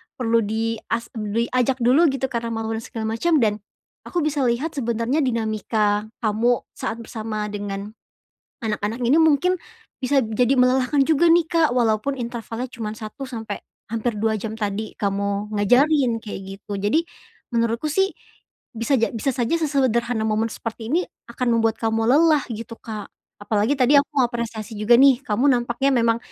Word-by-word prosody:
perlu 230 Hz, -2 st, +2 dB
dias 225 Hz, +1 st, -2 dB
bli 220 Hz, +1 st, -2 dB
diajak 255 Hz, 0 st, +1 dB
dulu 275 Hz, +8 st, +5 dB
gitu 265 Hz, -2 st, -1 dB
karena 235 Hz, -1 st, -2 dB
malu 225 Hz, 0 st, -3 dB
dan -, -, -10 dB
segala 225 Hz, -1 st, -5 dB
macem. 340 Hz, +3 st, +2 dB
Dan 210 Hz, -1 st, +1 dB, 0.4 s
aku 350 Hz, -, -2 dB
bisa 295 Hz, -2 st, 0 dB
lihat 255 Hz, +6 st, 0 dB
sebenernya 235 Hz, +2 st, 0 dB
dinamika 215 Hz, -3 st, 0 dB, 0.2 s
kamu 230 Hz, +3 st, +2 dB
saat 225 Hz, -, -4 dB
bersama 220 Hz, -2 st, -4 dB
dengan 205 Hz, 0 st, -5 dB, 0.7 s
anak-anak 210 Hz, +1 st, -2 dB
ini 280 Hz, +7 st, +4 dB
mungkin 320 Hz, +4 st, +3 dB, 0.5 s
bisa 270 Hz, +2 st, +3 dB
jadi 245 Hz, +4 st, +2 dB
melelahkan 255 Hz, +2 st, +3 dB
juga, 320 Hz, +2 st, +3 dB
nih, 340 Hz, 0 st, +5 dB
Kak. 330 Hz, -3 st, +3 dB
Walaupun 235 Hz, +2 st, +1 dB
intervalnya 235 Hz, 0 st, -5 dB
cuma 225 Hz, -3 st, -5 dB
satu 225 Hz, +5 st, -7 dB
sampai 225 Hz, -4 st, -5 dB, 0.3 s
hampir 230 Hz, 0 st, -1 dB
dua 220 Hz, +1 st, +1 dB
jam 220 Hz, +1 st, -5 dB
tadi 210 Hz, 0 st, -3 dB
kamu 200 Hz, +1 st, -2 dB
ngajarin 250 Hz, +3 st, +3 dB
kayak 205 Hz, -3 st, -6 dB, 0.2 s
gitu. 205 Hz, 0 st, -8 dB
Jadi, 210 Hz, +12 st, +2 dB, 0.5 s
menurutku 230 Hz, +4 st, 0 dB
sih 385 Hz, +5 st, +2 dB, 0.6 s
bisa 230 Hz, +5 st, +1 dB
ja 230 Hz, -, +1 dB
bisa 230 Hz, +4 st, -1 dB
saja 240 Hz, +3 st, -1 dB
sesederhana 245 Hz, -6 st, +1 dB
momen 215 Hz, +1 st, +1 dB
seperti 225 Hz, 0 st, -6 dB
ini, 340 Hz, +4 st, +3 dB, 0.3 s
akan 240 Hz, -1 st, +1 dB
membuat 225 Hz, 0 st, +1 dB
kamu 225 Hz, 0 st, +1 dB
lelah 305 Hz, +2 st, +5 dB
gitu, 230 Hz, +1 st, -6 dB
Kak. 215 Hz, -2 st, -6 dB, 0.4 s
Apalagi 210 Hz, +6 st, +1 dB
tadi 260 Hz, +1 st, +4 dB
aku 285 Hz, +1 st, +1 dB
apresiasi 235 Hz, -2 st, -4 dB
juga, 215 Hz, +3 st, +5 dB
nih, 270 Hz, -2 st, +6 dB
kamu 235 Hz, +1 st, 0 dB
nampaknya 240 Hz, +2 st, +1 dB
memang 230 Hz, -2 st, +3 dB
230 Hz, 155 wpm, -22 LUFS, 220-265 Hz, 0.7 s, nih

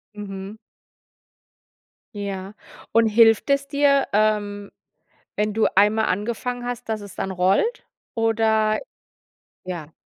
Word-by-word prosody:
Mhm. 195 Hz, 0 st, -7 dB, 1.6 s
Ja, 200 Hz, -1 st, -5 dB, 0.4 s
und 230 Hz, 0 st, +4 dB
hilft 225 Hz, +2 st, +4 dB
es 280 Hz, 0 st, +1 dB
dir, 280 Hz, -1 st, +3 dB
ähm, 205 Hz, -1 st, 0 dB, 0.7 s
wenn 210 Hz, 0 st, 0 dB
du 220 Hz, -, +3 dB
einmal 210 Hz, +2 st, +4 dB
angefangen 240 Hz, +5 st, -3 dB
hast, 245 Hz, -1 st, -5 dB
dass 220 Hz, -1 st, -2 dB
es 200 Hz, -1 st, -11 dB
dann 190 Hz, -, -3 dB
rollt 190 Hz, -, +1 dB, 0.3 s
oder 220 Hz, -1 st, +2 dB, 0.8 s
ja, 170 Hz, -4 st, -6 dB
215 Hz, 105 wpm, -23 LUFS, 200-230 Hz, 1.6 s, und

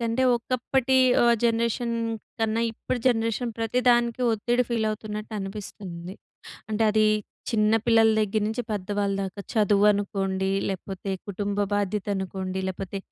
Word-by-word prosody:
కంటే, 230 Hz, +2 st, 0 dB
ఒకప్పటి 255 Hz, +2 st, 0 dB, 0.3 s
ఆహ్, 235 Hz, 0 st, +5 dB
జనరేషన్ 235 Hz, 0 st, +1 dB, 0.5 s
కన్నా 225 Hz, 0 st, +1 dB
ఇప్పుడు 245 Hz, +2 st, -3 dB
జనరేషన్ 230 Hz, 0 st, +1 dB
ప్రతి 225 Hz, +2 st, 0 dB
దానికి 240 Hz, 0 st, +3 dB
ఒత్తిడి 240 Hz, +3 st, +1 dB
ఫీలవుతున్నట్టు 215 Hz, -1 st, -2 dB
అనిపిస్తుంది. 195 Hz, -3 st, -7 dB, 0.6 s
అంటే, 215 Hz, +1 st, 0 dB
అదీ 215 Hz, 0 st, +3 dB, 0.4 s
చిన్న 215 Hz, -1 st, +2 dB
పిల్లల 225 Hz, -1 st, +5 dB
దగ్గర 215 Hz, 0 st, 0 dB
నుంచి 225 Hz, +3 st, -2 dB
పెద్దవాళ్ళ 200 Hz, 0 st, -1 dB
దాకా. 190 Hz, 0 st, -5 dB
చదువు 205 Hz, -2 st, +4 dB
అనుకోండి, 195 Hz, -1 st, -1 dB, 0.2 s
లేపోతే 195 Hz, +1 st, -5 dB, 0.2 s
కుటుంబ 200 Hz, +1 st, -3 dB, 0.2 s
బాధ్యత 205 Hz, 0 st, -1 dB
అనుకోండి, 190 Hz, 0 st, -3 dB
లేపోతే 195 Hz, +1 st, -5 dB
215 Hz, 125 wpm, -26 LUFS, 195-230 Hz, 0.6 s, ఆహ్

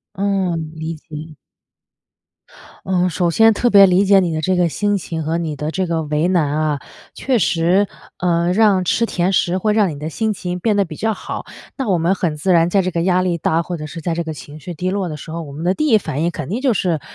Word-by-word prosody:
嗯， 185 Hz, -5 st, -1 dB
理 160 Hz, +1 st, -4 dB
解。 155 Hz, 0 st, -10 dB, 1.5 s
嗯， 180 Hz, -1 st, +1 dB
首 175 Hz, -1 st, 0 dB
先 225 Hz, +5 st, +5 dB
特 240 Hz, +3 st, +1 dB
别 200 Hz, -3 st, +8 dB
理 190 Hz, +1 st, +4 dB
解 195 Hz, -1 st, +6 dB
你 175 Hz, -3 st, -1 dB
的 155 Hz, -, -1 dB
这 185 Hz, +4 st, +1 dB
个 175 Hz, -1 st, +3 dB
心 205 Hz, +4 st, 0 dB
情 165 Hz, -3 st, -4 dB
和 160 Hz, +2 st, -1 dB
你 160 Hz, -3 st, -3 dB
的 150 Hz, +2 st, -4 dB
这 185 Hz, +2 st, -1 dB
个 165 Hz, -1 st, -1 dB
为 150 Hz, +2 st, 0 dB
难 155 Hz, -5 st, +1 dB
啊。 150 Hz, -3 st, 0 dB, 0.3 s
确 260 Hz, -3 st, 0 dB
实， 175 Hz, +2 st, +2 dB, 0.3 s
呃， 175 Hz, 0 st, +1 dB
让 200 Hz, -2 st, +3 dB
吃 230 Hz, -, +2 dB
甜 185 Hz, -3 st, 0 dB
食 185 Hz, 0 st, +1 dB
会 210 Hz, +3 st, +1 dB
让 210 Hz, -4 st, +3 dB
你 145 Hz, -, -7 dB
的 150 Hz, -, -4 dB
心 220 Hz, +7 st, -1 dB
情 180 Hz, -3 st, -4 dB
变 215 Hz, +1 st, +1 dB
得 200 Hz, -, +2 dB
比 155 Hz, -, -9 dB
较 220 Hz, +5 st, 0 dB
好。 -, -, -6 dB, 0.3 s
那 265 Hz, -7 st, -2 dB
我 180 Hz, -, +2 dB
们 170 Hz, +4 st, +2 dB
很 170 Hz, -5 st, -2 dB
自 185 Hz, +5 st, +1 dB
然 170 Hz, +1 st, +3 dB
在 195 Hz, +1 st, +3 dB
这 185 Hz, -, -1 dB
个 170 Hz, -1 st, -1 dB
压 180 Hz, 0 st, +2 dB
力 180 Hz, -2 st, 0 dB
大， 165 Hz, +1 st, 0 dB
或 175 Hz, +1 st, -5 dB
者 155 Hz, -, -7 dB
是 165 Hz, +3 st, -8 dB
在 165 Hz, +1 st, -2 dB
这 170 Hz, 0 st, -2 dB
个 160 Hz, -, -4 dB
情 150 Hz, 0 st, -10 dB
绪 175 Hz, -, -7 dB
低 180 Hz, +3 st, -3 dB
落 190 Hz, -3 st, -2 dB
的 150 Hz, -, -6 dB
时 155 Hz, -, -10 dB
候， 165 Hz, +1 st, -4 dB
我 145 Hz, -, -9 dB
们 150 Hz, +4 st, -7 dB
的 180 Hz, +2 st, +1 dB
第 305 Hz, -, 0 dB
1 220 Hz, -5 st, +5 dB
反 150 Hz, -5 st, -4 dB
应 170 Hz, -, +1 dB
肯 155 Hz, -5 st, -6 dB
定 235 Hz, +8 st, -3 dB
就 265 Hz, -, +3 dB
是 175 Hz, -6 st, 0 dB
175 Hz, 270 characters per minute, -19 LUFS, 160-195 Hz, 1.5 s, 别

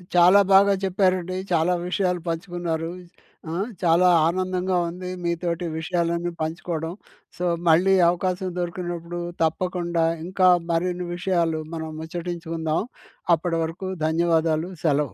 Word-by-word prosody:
చాలా 180 Hz, +3 st, +7 dB
బాగా 200 Hz, +1 st, +6 dB
చెప్పారండి. 185 Hz, -1 st, +1 dB, 0.2 s
చాలా 170 Hz, +1 st, +3 dB
విషయాలు 180 Hz, -1 st, 0 dB
పంచుకున్నారూ. 165 Hz, -1 st, -3 dB, 0.6 s
ఆ! -, -, -3 dB, 0.3 s
చాలా 170 Hz, +1 st, +5 dB, 0.2 s
ఆనందంగా 185 Hz, +1 st, 0 dB
ఉంది 180 Hz, +1 st, -7 dB, 0.2 s
మీతోటి 170 Hz, 0 st, -1 dB
విషయాలన్నీ 170 Hz, +1 st, -1 dB
పంచుకోడం. 160 Hz, +1 st, -3 dB, 0.4 s
సో, 180 Hz, -, -4 dB, 0.3 s
మళ్ళీ 180 Hz, +4 st, +5 dB, 0.2 s
అవకాశం 185 Hz, +1 st, -1 dB
దొరికినప్పుడు, 175 Hz, -1 st, -4 dB, 0.2 s
తప్పకుండా 170 Hz, 0 st, 0 dB, 0.2 s
ఇంకా 185 Hz, +1 st, +2 dB, 0.2 s
మరిన్ని 180 Hz, +1 st, -1 dB
విషయాలు 170 Hz, -3 st, 0 dB
మనం 160 Hz, -1 st, -4 dB
ముచ్చటించుకుందాం. 165 Hz, -1 st, -3 dB, 0.5 s
అప్పటి 165 Hz, +1 st, -2 dB
వరకు 175 Hz, +4 st, -5 dB, 0.2 s
ధన్యవాదాలు. 165 Hz, 0 st, +1 dB
సెలవు. 145 Hz, -4 st, +1 dB
175 Hz, 105 wpm, -24 LUFS, 165-180 Hz, 0.6 s, చాలా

